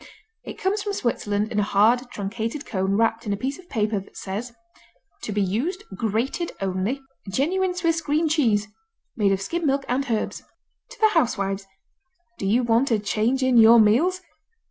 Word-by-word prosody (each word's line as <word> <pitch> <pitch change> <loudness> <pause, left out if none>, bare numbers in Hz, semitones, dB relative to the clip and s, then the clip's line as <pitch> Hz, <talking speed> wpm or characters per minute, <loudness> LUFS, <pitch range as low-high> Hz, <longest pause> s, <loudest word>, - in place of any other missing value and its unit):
It - - -8
comes 400 +2 0
from 410 0 -3
Switzerland 215 - -1
in 210 - 0
a - - +4
hard, 225 +5 +3
truncated 225 +7 -4
cone 190 -1 -1
wrapped 225 0 +1
in 205 - 0
a - - -2
piece 265 - -3
of 365 -1 -16
paper 215 -3 0
that 195 - -14
says: 210 +6 -5 0.7
To - - -5
be 205 0 +1
used 280 - -2
grated 230 - -2
only 195 +7 -1 0.3
Genuine 360 - 0
Swiss 335 -2 0
Green 310 +2 +1
Cheese 230 -10 +2 0.5
Made 205 -4 +2
of 195 - +1
skimmed 335 - -2
milk 275 0 +1
and 265 +2 -1
herbs 220 -2 -2 0.5
To - - -13
the 435 - +5
housewives! 200 - 0 0.7
Do 195 - -2
you 235 +5 +3
want 235 +3 +2
a 225 - +3
change 220 +5 0
in 260 -2 +3
your 230 +1 +8
meals? 290 - +3
230 Hz, 175 wpm, -24 LUFS, 205-290 Hz, 0.7 s, your